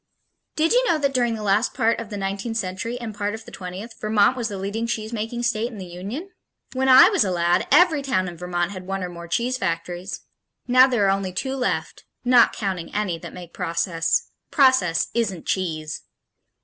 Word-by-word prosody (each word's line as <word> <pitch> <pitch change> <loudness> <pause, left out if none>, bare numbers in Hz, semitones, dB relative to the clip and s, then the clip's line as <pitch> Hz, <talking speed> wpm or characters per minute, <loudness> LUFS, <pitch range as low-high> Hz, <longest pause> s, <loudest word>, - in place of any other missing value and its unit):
Did 315 +1 +2
you - - +4
know 335 - +3
that 280 -2 0
during 240 -3 +1
the 215 - -6
last 205 +3 +1
part 225 +1 +2
of 230 -3 -7
the 205 - -5
nineteenth 200 +4 -3
century 215 +4 -3
and 230 -3 -6
part 205 +1 -2
of 220 - -11
the - - -12
twentieth, 190 +5 -7
Vermont 215 +2 +3
was 240 -3 -2
the 205 -3 -5
leading 205 +4 -3
cheesemaking 225 +1 -3
state 235 +1 0
in 220 - -10
the 190 - -7
Union? 200 - -7 0.4
When 265 0 +1
I 260 0 +9
was 395 -5 +3
a 195 - -1
lad, 175 -1 +1
every 335 -5 +5
town 185 -9 0
in 175 - -7
Vermont 175 +1 -2
had 185 -2 -8
one 195 -1 -3
or 180 - -3
more 170 -1 -9
cheese 245 +8 -1
factories. 175 +1 -3 0.5
Now 255 +1 +7
there 240 -6 +1
are 195 - +4
only 195 -1 -1
two 265 +8 -2
left 255 -2 -2 0.2
not 245 -1 +6
counting 190 -5 -4
any 190 -5 -1
that - - -9
make 175 -2 -11
process. 165 0 -1 0.2
Process 260 - +3
isn't 205 -7 -1
cheese! 155 -5 -2
205 Hz, 200 wpm, -23 LUFS, 180-240 Hz, 0.5 s, I